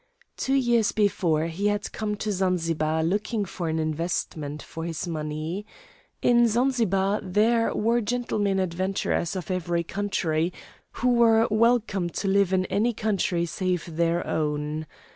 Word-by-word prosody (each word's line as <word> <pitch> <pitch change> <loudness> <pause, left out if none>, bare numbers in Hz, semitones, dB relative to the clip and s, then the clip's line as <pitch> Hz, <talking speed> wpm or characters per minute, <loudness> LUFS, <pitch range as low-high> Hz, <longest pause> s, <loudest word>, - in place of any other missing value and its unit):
Two 270 - 0
years 240 -5 +3
before 180 -7 +1
he 170 +5 -1
had 205 0 -1
come 210 -1 -2
to 210 +1 -3
Zanzibar 165 -4 0
looking 205 +5 0
for 170 -2 -4
an 160 - -1
investment 155 -2 -2
for 165 - -7
his 165 +1 -4
money. 155 +3 -3 0.6
In 240 -1 +5
Zanzibar 215 -5 +1
there 225 +5 +2
were 230 +3 +2
gentlemen 210 -4 0
adventurers 185 0 -1
of 185 0 -4
every 175 -2 -1
country, 170 -4 -1 0.4
who 250 - 0
were 230 -1 +5
welcome 215 -5 +2
to 195 - -3
live 195 -1 +3
in 185 -1 +2
any 230 +6 +1
country 195 -6 0
save 175 -1 -2
their 170 +1 +1
own. 150 0 -2
190 Hz, 140 wpm, -26 LUFS, 165-215 Hz, 0.6 s, In